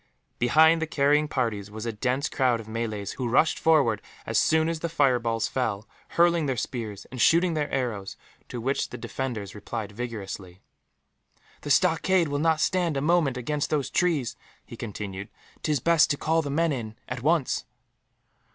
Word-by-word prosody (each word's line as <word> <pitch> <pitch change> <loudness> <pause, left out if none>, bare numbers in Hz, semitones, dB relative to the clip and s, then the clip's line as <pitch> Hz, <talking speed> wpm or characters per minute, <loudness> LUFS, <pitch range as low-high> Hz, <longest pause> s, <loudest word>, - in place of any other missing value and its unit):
Behind 160 +7 +5
the 160 - -1
carrying 150 0 +2
parties 115 -8 -2
was 110 +2 -7
a 115 - -1
dense 130 +7 -1
crowd 125 -3 +1
of 110 - -9
Malays, 110 -3 -3
who 125 - -3
rushed 145 +7 +3
forward 140 -10 +3 0.2
as - - +1
soon 160 0 +3
as 165 -1 -2
the 170 - -3
fireballs 125 -7 +1
fell, 110 -5 -2 0.3
hurling 170 -2 +4
their 130 -2 -1
spears 110 -7 -4
and 130 -2 -4
shooting 170 +1 +4
their 150 -2 -1
arrows, 110 -7 -3 0.3
to 120 - -5
which 135 +4 -1
the - - -7
defenders 115 -7 -4
replied 105 0 -5
vigorously. 100 -5 -6 1.0
"The - - -6
stockade 185 -4 +3
will 145 0 -1
not 160 0 +2
stand 175 -4 +1
a - - +1
moment 155 -4 +2
against 145 +4 -2
those 145 -3 -1
trees," 155 -9 +1 0.3
he - - -10
continued. 100 -3 -6 0.3
"'Tis 150 -3 0
best 165 +4 +4
to 145 - 0
call 165 +2 +1
the 145 - -5
men 165 +3 +1
in, 110 -5 -4
at 125 0 -5
once." 155 0 +1
130 Hz, 170 wpm, -26 LUFS, 115-160 Hz, 1.0 s, Behind